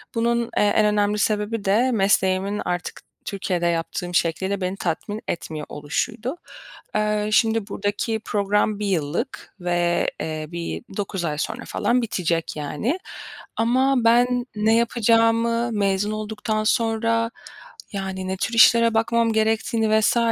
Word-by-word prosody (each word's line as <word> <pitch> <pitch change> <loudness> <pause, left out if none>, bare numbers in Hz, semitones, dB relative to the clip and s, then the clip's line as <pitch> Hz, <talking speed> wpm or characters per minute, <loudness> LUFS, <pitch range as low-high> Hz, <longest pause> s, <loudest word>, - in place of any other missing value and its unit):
Bunun, 235 +1 +2 0.2
eee, - - +4
en 210 +1 +3
önemli 210 0 +2
sebebi 210 +1 -1
de 225 +7 +3
mesleğimin 195 -1 +1
artık 175 0 -3 0.2
Türkiye'de 185 -3 -2
yaptığım 170 +1 -2
şekliyle 190 +4 0
beni 185 +1 -2
tatmin 200 +5 -3
etmiyor 155 -3 -4
oluşuydu. 225 - -3 0.6
Eee, 210 0 +1
şimdi 220 0 +2
burdaki 205 +2 -2
program 205 +1 +1
1 210 - -2
yıllık 175 - -3
ve, 175 -1 +1
eee, 155 -1 -4
bir 170 -1 -5
9 190 -3 -3
ay 150 -2 -2
sonra - - -3
falan 250 +1 +1
bitecek, 175 -7 -1
yani. 150 - -2 0.6
Ama 260 +4 +2
ben 245 +1 +3
ne 215 +1 +3
yapacağımı, 230 0 +2
mezun 200 -1 0
olduktan 215 0 -2
sonra 230 +1 +1 0.6
yani 190 -1 -4
ne 190 0 -2
tür 235 - -2
işlere 230 0 +6
bakmam 230 0 +2
gerektiğini 220 0 +2
vs. 220 - +2
210 Hz, 130 wpm, -23 LUFS, 190-230 Hz, 0.6 s, işlere